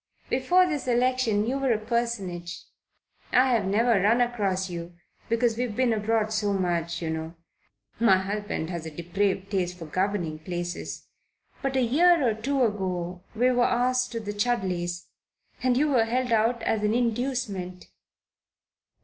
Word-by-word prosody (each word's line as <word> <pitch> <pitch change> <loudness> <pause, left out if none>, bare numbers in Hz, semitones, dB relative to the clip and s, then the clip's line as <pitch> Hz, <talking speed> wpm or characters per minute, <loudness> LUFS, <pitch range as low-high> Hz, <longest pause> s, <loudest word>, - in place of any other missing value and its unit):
"Before 350 +9 +4
this 300 -7 -3
election 245 -3 +2
you 265 +4 -1
were 270 -2 +1
a 225 - +3
personage. 215 -6 -3 0.7
I've 250 -5 +3
never 215 +1 +3
run 220 +5 +3
across 200 -6 0
you 170 -1 -7 0.3
because 230 0 +1
we've 245 -4 -2
been 255 -1 +2
abroad 215 0 0
so 210 -2 0
much, 170 -3 -1
you 160 - -2
know 160 +1 -5 0.6
my 225 -5 +5
husband 195 -3 -3
has 170 -2 -5
a - - -4
depraved 190 +4 -2
taste 180 -2 -1
for 165 - -8
governing 180 -2 -1
places 175 +1 -5 0.6
but 270 -1 -2
a 260 - +3
year 315 +4 +4
or 225 - +2
two 260 +5 0
ago 185 -5 -2
we 250 +3 +3
were 245 -1 +2
asked 250 +1 +1
to 230 - -2
the 205 -2 -5
Chudleys, 185 -6 -1 0.6
and 250 -1 +2
you 300 +3 +3
were 245 -5 +3
held 250 +2 -1
out 230 +1 +2
as 220 - 0
an 210 +1 +1
inducement." 235 -6 -2
215 Hz, 155 wpm, -26 LUFS, 185-245 Hz, 0.7 s, my